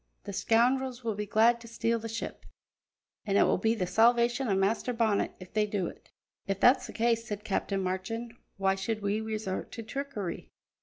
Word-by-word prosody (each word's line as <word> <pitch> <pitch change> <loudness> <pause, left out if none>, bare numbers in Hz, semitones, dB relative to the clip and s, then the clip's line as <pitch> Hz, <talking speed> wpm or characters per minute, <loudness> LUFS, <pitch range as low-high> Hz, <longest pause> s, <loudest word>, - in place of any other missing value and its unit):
The 200 - -6
scoundrels 245 +5 +2
will 225 -1 -1
be 210 0 -4
glad 230 +3 +4
to 230 - -11
steal 230 0 0
the 225 +1 -6
ship, 230 +1 -5 0.8
an' 200 0 +2
it - - +6
will - - +2
be 225 +3 +2
the 190 -5 -1
salvation 235 +6 +3
o' 200 - +2
Master 210 +6 +1
Bonnet 225 -3 +1
if 185 -1 -12
they 215 -1 +2
do 205 -3 -1
it." - - -9 0.4
"If 195 0 -1
that's 250 +2 +5
the - - -8
case," 230 0 +1
said 210 -1 -5
Captain 195 -2 -1
Marchand, 210 +6 -3 0.2
"why 195 0 +2
should 210 +2 -3
we 205 +2 0
resort 215 -3 -4
to 230 - -6
trickery? 240 -6 -5
220 Hz, 195 wpm, -30 LUFS, 200-235 Hz, 0.8 s, it